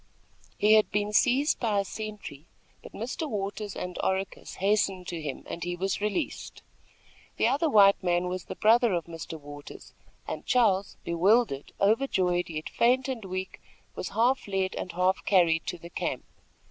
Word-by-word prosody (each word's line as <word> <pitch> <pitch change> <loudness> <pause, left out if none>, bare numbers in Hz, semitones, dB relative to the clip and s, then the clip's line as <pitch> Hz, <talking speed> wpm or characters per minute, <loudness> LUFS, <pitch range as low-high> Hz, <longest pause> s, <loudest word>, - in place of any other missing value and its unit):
He 210 +1 +5
had 215 -1 +5
been 210 0 -1
seized 260 +7 +3
by 220 -4 0
a 200 - -1
sentry; 210 -9 -7 0.3
but - - -12
Mr. 260 +8 -4
Waters 205 -1 -4
and 180 0 -5
Oracus 190 0 -2
hastened 195 -2 +1
to 170 -2 -4
him, 145 -3 -5
and 170 - -5
he 175 0 -2
was 190 +2 -2
released. 210 +9 -3 0.7
The - - +3
other 285 +6 +1
white 200 -5 +6
man 175 -1 +1
was 180 -1 -4
the - - -7
brother 230 0 +4
of 170 -2 -1
Mr. 165 -1 -8
Waters, 145 0 -11 0.3
and - - -5
Charles, 205 -6 +2
bewildered, 175 - +2
overjoyed, 190 -6 +2
yet 155 -1 -5
faint 250 +2 +2
and 255 -5 -4
weak, 185 0 -5 0.3
was - - -5
half 245 +2 +2
led 190 -1 -1
and 180 - -5
half 185 +1 +1
carried 170 -4 +3
to 175 - -3
the 170 +1 -12
camp. - - -3
195 Hz, 165 wpm, -28 LUFS, 175-220 Hz, 0.7 s, white